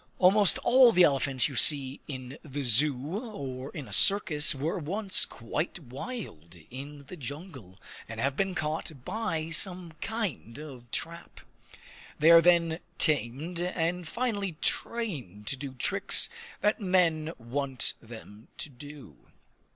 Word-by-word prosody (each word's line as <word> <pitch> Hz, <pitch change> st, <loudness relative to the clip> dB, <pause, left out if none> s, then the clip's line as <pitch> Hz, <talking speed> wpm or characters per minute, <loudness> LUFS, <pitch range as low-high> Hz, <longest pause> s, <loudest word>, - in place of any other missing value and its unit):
Almost 195 Hz, +1 st, +5 dB
all 250 Hz, -1 st, +7 dB
the 180 Hz, -4 st, +5 dB
elephants 135 Hz, -4 st, +3 dB
you 140 Hz, -, -8 dB
see 135 Hz, -1 st, +3 dB
in 130 Hz, -1 st, -7 dB
the 145 Hz, -1 st, -5 dB
zoo 140 Hz, -, +1 dB
or 140 Hz, -, -6 dB
in 145 Hz, -5 st, -8 dB
a -, -, -8 dB
circus 175 Hz, -8 st, +2 dB
were 160 Hz, +8 st, -2 dB
once 190 Hz, +5 st, +1 dB
quite 145 Hz, +8 st, -4 dB
wild 135 Hz, -, -8 dB, 0.2 s
in 140 Hz, +2 st, -8 dB
the 180 Hz, -, -9 dB
jungle, 140 Hz, -, -9 dB, 0.3 s
and 110 Hz, -1 st, -6 dB
have 135 Hz, +3 st, 0 dB
been 195 Hz, +1 st, -1 dB
caught 155 Hz, -3 st, -3 dB
by 165 Hz, -8 st, -2 dB
some 180 Hz, +1 st, 0 dB
kind 200 Hz, -, -4 dB
of 135 Hz, -6 st, -10 dB
trap. 170 Hz, +5 st, -6 dB, 0.8 s
They 160 Hz, +2 st, +6 dB
are 165 Hz, 0 st, +9 dB
then 170 Hz, -1 st, +3 dB, 0.2 s
tamed, 150 Hz, +3 st, 0 dB
and 175 Hz, -1 st, -1 dB
finally 205 Hz, -3 st, -2 dB
trained 150 Hz, -, -3 dB
to 135 Hz, -, -1 dB
do 135 Hz, 0 st, -7 dB
tricks 125 Hz, -, +4 dB, 0.3 s
that 210 Hz, +1 st, +1 dB
men 170 Hz, -4 st, +2 dB
want 130 Hz, +1 st, -2 dB
them 110 Hz, -1 st, -12 dB
to -, -, -3 dB
do. 140 Hz, -, -13 dB
150 Hz, 135 wpm, -29 LUFS, 130-180 Hz, 0.8 s, are